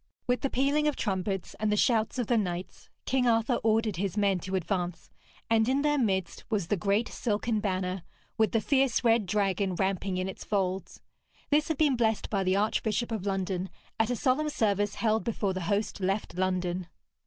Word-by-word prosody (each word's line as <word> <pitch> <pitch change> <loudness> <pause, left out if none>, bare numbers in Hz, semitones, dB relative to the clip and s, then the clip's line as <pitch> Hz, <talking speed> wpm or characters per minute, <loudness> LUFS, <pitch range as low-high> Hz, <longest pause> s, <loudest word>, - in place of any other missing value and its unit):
With 245 -1 +1
the 275 - 0
pealing 280 +4 +2
of 300 - +1
trumpets 195 -2 -2
and 215 0 +1
the 210 - +2
shouts 225 0 +2
of 245 - 0
the 240 - +2
knights, 180 -4 -3 0.2
King 255 -1 +2
Arthur 230 +1 +2
ordered 220 -3 +2
his 195 +2 -2
men 200 -2 +2
to 190 +2 -4
advance, 180 -2 -2 0.4
and 225 +1 +3
in 275 +2 +2
their 295 -1 +2
midst 190 -7 -1
was 200 -7 -1
the - - +3
great 205 +4 +1
silken 220 0 -1
banner 185 -2 -2 0.3
with 220 -3 +2
the 225 - +2
fierce 270 0 +2
red 230 -3 +3
dragon 195 -1 0
ramping 190 0 -1
in 185 +1 -1
its 190 - -7
folds. 190 -2 -2 0.5
This 300 +1 +3
had 320 - -1
been 290 -3 +3
blessed 225 -2 0
by 195 -2 +1
the 185 0 +2
Archbishop 220 +3 0
of 210 -3 -3
London 190 -1 -1 0.3
at 225 +1 +2
a 245 - +1
solemn 275 +5 +1
service 205 -6 0
held 220 -1 +1
before 210 -4 -1
the 185 - -4
host 205 +1 0
left 195 +2 -1
London. 185 -1 -1
210 Hz, 190 wpm, -29 LUFS, 190-235 Hz, 0.5 s, and